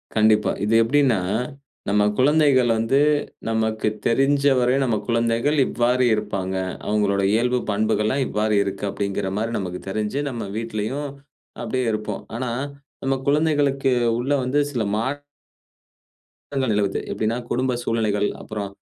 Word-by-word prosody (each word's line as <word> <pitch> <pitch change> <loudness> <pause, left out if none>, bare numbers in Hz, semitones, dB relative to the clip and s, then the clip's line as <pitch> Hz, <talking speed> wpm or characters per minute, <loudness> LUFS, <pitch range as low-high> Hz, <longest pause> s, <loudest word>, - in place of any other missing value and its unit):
கண்டிப்பா. 110 -1 +4
இது 105 +2 +2
எப்டினா, 130 -2 +3 0.7
நம்ம 105 0 +3
குழந்தைகள் 140 -2 +4
வந்து, 115 +5 +2 0.5
நமக்கு 110 -1 0 0.2
தெரிஞ்சவரை 135 0 +3
நம்ம 120 -4 +1
குழந்தைகள் 115 +5 +1
இவ்வாறு 125 +1 +2
இருப்பாங்க. 100 -3 -3 0.3
அவங்களுடைய 100 -2 +1
இயல்பு, 125 +2 +2
பண்புகள்லாம் 110 +5 +1
இவ்வாறு 105 0 0
இருக்கு, 100 +1 -4
அப்டின்கிற 100 -1 -2
மாரி 115 +1 -2
நமக்கு 90 -2 -5
தெரிஞ்சு, 110 +7 -2
நம்ம 120 -5 -5
வீட்டிலேயும் 115 +6 -3 0.5
அபடியே 130 -1 -1
இருப்போம், 105 -1 -4
ஆனா 120 0 -2 0.5
நம்ம 135 0 +1
குழந்தைகளுக்கு 145 -2 +2 0.3
உள்ளே 135 +4 0
வந்து 130 +3 +1
சில 125 -6 -1
மா 110 - 0 1.5
ற்றங்கள், 135 -4 0 0.4
எப்டினா 110 +2 -1
குடும்ப 130 +1 0
சூழ்நிலைகள், 105 -3 0
அப்புறம் 105 -2 -5
115 Hz, 120 wpm, -22 LUFS, 105-130 Hz, 1.5 s, கண்டிப்பா